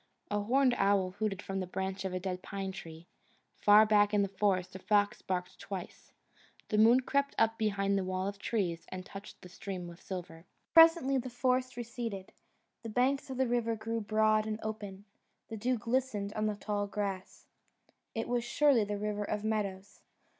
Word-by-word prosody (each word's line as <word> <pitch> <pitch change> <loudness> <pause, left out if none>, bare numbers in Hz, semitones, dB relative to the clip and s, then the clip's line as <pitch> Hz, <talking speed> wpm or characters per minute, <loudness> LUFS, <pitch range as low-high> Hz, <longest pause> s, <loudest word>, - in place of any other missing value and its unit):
A 205 - +1
horned 255 +5 +3
owl 195 -2 +3
hooted 205 -3 -1
from 195 0 -3
the 185 - -3
branch 190 +1 -3
of 190 - -2
a 185 - -2
dead 180 0 -4
pine 195 0 -4
tree; 165 -4 -10 0.5
far 210 +1 +7
back 210 -1 +4
in 205 - +4
the - - 0
forest 190 -2 0
a - - -6
fox 205 +1 +1
barked 180 -1 -3
twice. 190 -3 -8 0.6
The 210 - +2
moon 235 +4 +6
crept 280 +2 0
up 225 0 +2
behind 200 -2 +1
the - - -1
wall 185 +1 -2
of 200 0 -5
trees 185 -6 -2
and 185 0 -6
touched 200 +1 -10
the - - -9
stream 180 0 -6
with 170 +1 -11
silver. 175 -2 -7 0.3
Presently 325 -5 +7
the 255 +1 -5
forest 255 0 0
receded: 230 -5 -5 0.5
the 230 - -6
banks 260 +5 +1
of 260 - -5
the 260 -1 +2
river 235 -1 0
grew 225 +1 -3
broad 215 0 +2
and 215 0 -3
open; 205 -2 -6 0.4
the 225 - -5
dew 245 +4 0
glistened 230 -3 -1
on 215 0 0
the 210 - -1
tall 205 0 -2
grass; 200 -2 -4 0.7
it 225 - -2
was 240 -1 0
surely 265 -1 +3
the 205 0 -3
River 210 0 -2
of 210 0 -3
Meadows. 200 -3 -3
210 Hz, 185 wpm, -32 LUFS, 195-230 Hz, 0.7 s, far